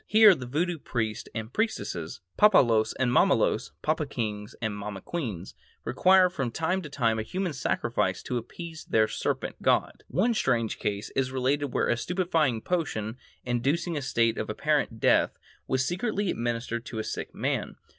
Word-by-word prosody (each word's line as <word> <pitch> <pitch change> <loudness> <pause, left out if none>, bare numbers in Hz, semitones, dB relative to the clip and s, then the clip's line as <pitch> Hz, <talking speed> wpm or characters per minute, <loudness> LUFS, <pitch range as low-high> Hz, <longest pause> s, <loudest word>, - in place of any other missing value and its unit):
Here 215 -1 +8
the 130 -7 -6
Voodoo 165 +6 -1
priests 110 -6 -3
and 110 +1 -5
priestesses, 90 - -2
papalois 115 - +5
and 125 -2 +2
mamalois - - +3
(papa 155 -1 0
kings 105 -5 -4
and 110 -2 -2
mama 105 -1 -5
queens) 105 - -5 0.3
require 185 0 +5
from 140 -9 -2
time 165 +9 -1
to 150 - -8
time 115 -5 +1
a - - 0
human 180 - -3
sacrifice 130 - -1
to 125 - -2
appease 160 +7 -9
their 110 -1 +3
serpent - - -3
god. - - +1
One 225 +7 +2
strange 120 - 0
case 105 +1 -3
is 130 -1 +1
related 135 +3 0
where - - +1
a 120 - +2
stupefying 165 -5 0
potion, 125 -11 -2 0.3
inducing 140 +8 0
a 145 - -2
state 115 -4 +1
of - - -3
apparent - - 0
death, - - +3 0.3
was 130 0 +1
secretly 200 - -1
administered 115 0 -2
to 115 - -6
a 110 - -1
sick - - -5
man. - - -2
130 Hz, 165 wpm, -27 LUFS, 115-170 Hz, 0.3 s, Here